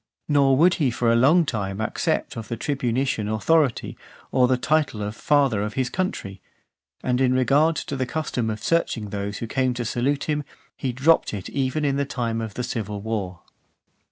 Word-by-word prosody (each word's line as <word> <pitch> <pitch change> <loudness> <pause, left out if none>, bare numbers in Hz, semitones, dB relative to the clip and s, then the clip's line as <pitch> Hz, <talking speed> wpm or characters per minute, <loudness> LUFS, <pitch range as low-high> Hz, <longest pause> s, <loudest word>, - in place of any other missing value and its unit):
Nor 140 -3 +4
would 175 +5 +5
he 140 - +3
for 120 -1 +1
a - - +4
long 155 +8 +5
time 100 -6 -3
accept 110 - -1
of 115 -2 -6
the 115 - -4
tribunitian 130 -4 -1
authority, 140 +5 +1 0.4
or 125 -1 +4
the 130 0 +2
title 145 -5 0
of 105 +1 -4
Father 135 -5 +2
of 105 +1 -3
his 130 -2 -1
Country. 100 - -3 0.6
And 125 0 +1
in 130 -1 +3
regard 145 +5 +3
to 140 - -4
the 130 -1 -2
custom 125 -7 -2
of 110 0 -5
searching 120 -10 0
those 100 0 -3
who - - -4
came 130 +1 0
to 120 -1 -3
salute 135 +5 0
him, 150 -1 -1 0.3
he 130 - -2
dropped 135 0 +2
it 95 - -6
even 140 +2 -1
in 140 -1 +1
the 140 - 0
time 115 -4 -2
of 110 -2 -6
the 125 - -3
civil 105 -4 -4
war. 100 -4 -4
125 Hz, 190 wpm, -24 LUFS, 110-140 Hz, 0.6 s, would